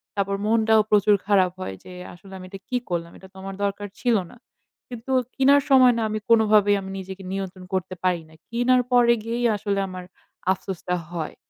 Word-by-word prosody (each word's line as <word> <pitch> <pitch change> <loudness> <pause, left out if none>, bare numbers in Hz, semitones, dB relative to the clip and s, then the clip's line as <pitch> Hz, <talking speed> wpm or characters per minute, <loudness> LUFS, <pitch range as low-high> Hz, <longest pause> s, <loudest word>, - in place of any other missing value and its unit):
তারপর 200 0 -1
মনটাও 220 0 +4
প্রচুর 210 0 +5
খারাপ 190 -3 +3
হয় 95 - -5
যে, 185 - -11 0.2
আসলে 190 +2 -15
আমি 185 - -10
এটা 195 0 -9
কি 250 - 0
করলাম? 170 -1 -3
এটা 190 - -14
তো - - -50
আমার 195 0 -6
দরকার 200 +1 -2
ছিল 240 -3 +2 0.2
না। - - -16 0.5
কিন্তু 245 +2 -7 0.2
কিনার 280 +2 +5
সময় 255 -2 +6
না - - -1
আমি 215 - -2
কোনভাবেই 215 -3 +5
আমি 190 - -8
নিজেকে 190 +1 -8
নিয়ন্ত্রণ 190 -1 -5
করতে 185 0 -2
পারি 180 -2 +1
না। 160 - -19 0.2
কিনার 245 +2 +3
পরে 240 -1 +5
গিয়েই 235 +2 -2
আসলে 200 -1 -2
আমার 185 -1 -8 0.5
আফসোসটা 180 -1 -3 0.2
হয়। 165 -3 -5
200 Hz, 190 wpm, -23 LUFS, 185-230 Hz, 0.5 s, সময়